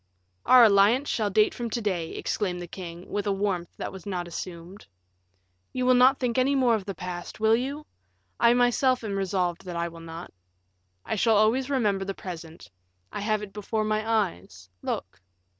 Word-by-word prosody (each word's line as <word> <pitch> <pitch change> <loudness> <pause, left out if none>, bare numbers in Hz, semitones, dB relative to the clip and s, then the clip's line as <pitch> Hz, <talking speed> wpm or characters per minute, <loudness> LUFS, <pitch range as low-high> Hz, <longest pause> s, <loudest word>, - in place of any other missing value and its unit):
"Our 255 -1 +8
alliance 215 +6 +5
shall 215 -3 0
date 210 +2 +3
from 235 -1 -4
to 235 - -2
day," 180 -7 -2
exclaimed 185 -4 -2
the 175 - -5
king, 175 0 -9
with 205 0 -2
a - - +2
warmth 195 -3 -2
that - - -4
was 190 0 -10
not 180 -3 -3
assumed. 175 - -8 0.9
"You 255 -1 -1
will 255 - +5
not 255 +2 +6
think 250 -1 0
any 270 +2 +2
more 255 -3 +3
of 210 -4 -1
the 195 -2 -5
past, 180 +1 -7
will 220 +1 +4
you? 280 +5 -3 0.5
I 235 +1 +5
myself 245 +1 +2
am 205 -3 -3
resolved 185 -3 -1
that 180 -1 -6
I 170 0 -1
will 165 0 -12
not. 165 +1 -9 0.7
I - - -3
shall 220 0 +3
always 235 +6 +2
remember 210 -8 +1
the 195 0 -4
present; 165 - -9 0.4
I - - -5
have 215 0 0
it 195 -2 -9
before 215 +1 -2
my 215 0 0
eyes; 95 - -2
look." 95 - -5
205 Hz, 190 wpm, -26 LUFS, 180-235 Hz, 0.9 s, Our